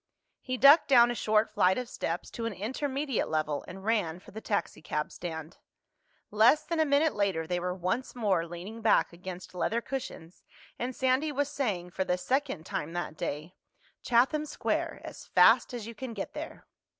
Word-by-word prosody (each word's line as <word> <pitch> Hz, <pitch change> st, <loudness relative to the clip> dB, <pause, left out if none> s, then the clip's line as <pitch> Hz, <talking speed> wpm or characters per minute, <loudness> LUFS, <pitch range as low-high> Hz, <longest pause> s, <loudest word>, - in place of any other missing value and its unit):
He 255 Hz, -1 st, -3 dB
ducked 280 Hz, +5 st, +7 dB
down 240 Hz, -3 st, +6 dB
a -, -, -1 dB
short 215 Hz, -1 st, +1 dB
flight 185 Hz, +1 st, +3 dB
of 250 Hz, -1 st, -3 dB
steps 170 Hz, -6 st, -4 dB
to 230 Hz, -1 st, -4 dB
an 230 Hz, -, -4 dB
intermediate 265 Hz, +6 st, -2 dB
level 155 Hz, -2 st, -1 dB
and 190 Hz, +2 st, -9 dB
ran 205 Hz, -8 st, 0 dB
for 180 Hz, -, -15 dB
the 220 Hz, -, -8 dB
taxicab 155 Hz, -7 st, -2 dB
stand. 160 Hz, -1 st, -7 dB, 0.7 s
Less 225 Hz, +9 st, +5 dB
than 335 Hz, -1 st, -2 dB
a 315 Hz, -, +4 dB
minute 290 Hz, +2 st, +3 dB
later 195 Hz, -6 st, 0 dB
they 175 Hz, +2 st, -1 dB
were 180 Hz, +1 st, -2 dB
once 185 Hz, +10 st, -2 dB
more 195 Hz, -8 st, +1 dB
leaning 185 Hz, +7 st, -8 dB
back 220 Hz, -5 st, +3 dB
against 180 Hz, +1 st, -8 dB
leather 220 Hz, +6 st, 0 dB
cushions 235 Hz, -10 st, -7 dB, 0.4 s
and 250 Hz, +1 st, -3 dB
Sandy 260 Hz, +4 st, +1 dB
was 285 Hz, 0 st, -1 dB
saying, 205 Hz, -12 st, -2 dB
for 190 Hz, -, -1 dB
the 180 Hz, -1 st, 0 dB
second 255 Hz, -, -1 dB
time 160 Hz, +3 st, -4 dB
that 175 Hz, -3 st, -4 dB
day, 150 Hz, +3 st, -4 dB, 0.5 s
"Chatham 270 Hz, +6 st, +2 dB
Square—as -, -, -3 dB
fast -, -, +5 dB
as 240 Hz, -4 st, -5 dB
you 230 Hz, -, -7 dB
can 240 Hz, +1 st, -6 dB
get 195 Hz, -, -5 dB
there." -, -, -8 dB
215 Hz, 175 wpm, -29 LUFS, 175-255 Hz, 0.7 s, ducked